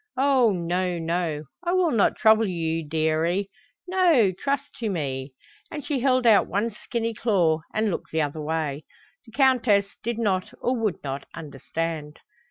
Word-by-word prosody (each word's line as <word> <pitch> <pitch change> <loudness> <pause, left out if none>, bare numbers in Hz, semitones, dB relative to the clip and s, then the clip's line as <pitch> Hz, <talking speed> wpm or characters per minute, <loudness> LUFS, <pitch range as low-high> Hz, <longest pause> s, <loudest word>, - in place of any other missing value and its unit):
Oh, 260 -4 +4
no, 180 0 -1
no, 165 -2 -2 0.2
I 350 0 0
will 365 -3 +3
not 225 -6 +3
trouble 220 -1 +4
you, 165 -2 -2
dearie. 160 +5 0 0.4
No, 345 - +4
trust 280 +9 -3
to 225 -3 -1
me;" 135 -6 -4 0.3
and 295 -3 -7
she 290 -4 -1
held 255 -1 +2
out 220 -3 +5
one 220 +4 -1
skinny 230 +2 -3
claw, 180 -9 +2
and 215 -1 0
looked - - -5
the 160 - +1
other 150 +1 -4
way. 155 -2 -2 0.4
The - - -14
Countess 235 -6 +3
did 235 0 -3
not 195 -5 -1
or 250 - 0
would 220 -7 -2
not 135 0 -5
understand. 155 +1 -5
195 Hz, 160 wpm, -25 LUFS, 160-235 Hz, 0.4 s, out